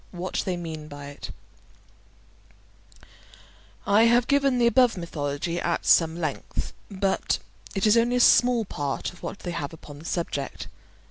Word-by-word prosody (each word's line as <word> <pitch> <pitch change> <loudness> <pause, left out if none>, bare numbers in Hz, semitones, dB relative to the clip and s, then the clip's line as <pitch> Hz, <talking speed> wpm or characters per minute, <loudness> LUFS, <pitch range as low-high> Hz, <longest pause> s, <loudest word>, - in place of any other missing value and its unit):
WHAT 180 +1 -3
THEY 185 -2 -1
MEAN 160 -3 -6
BY 145 -1 -9
IT 145 - -8 2.5
I 210 +3 +5
have 235 +1 +4
given 275 -2 +2
the 240 - +3
above 240 -2 +4
mythology 165 0 -3
at 170 0 -1
some 165 0 +4
length, 155 -4 -4 0.2
but 195 -1 0 0.4
it 195 - +1
is 215 +1 +5
only 235 +1 +3
a - - +2
small 245 -1 +5
part 145 -2 -3
of 180 - -17
what - - -5
they 175 - -4
have 165 -3 -4
upon 145 -2 -11
the 160 - -13
subject. 165 -6 -3
175 Hz, 150 wpm, -26 LUFS, 155-230 Hz, 2.5 s, I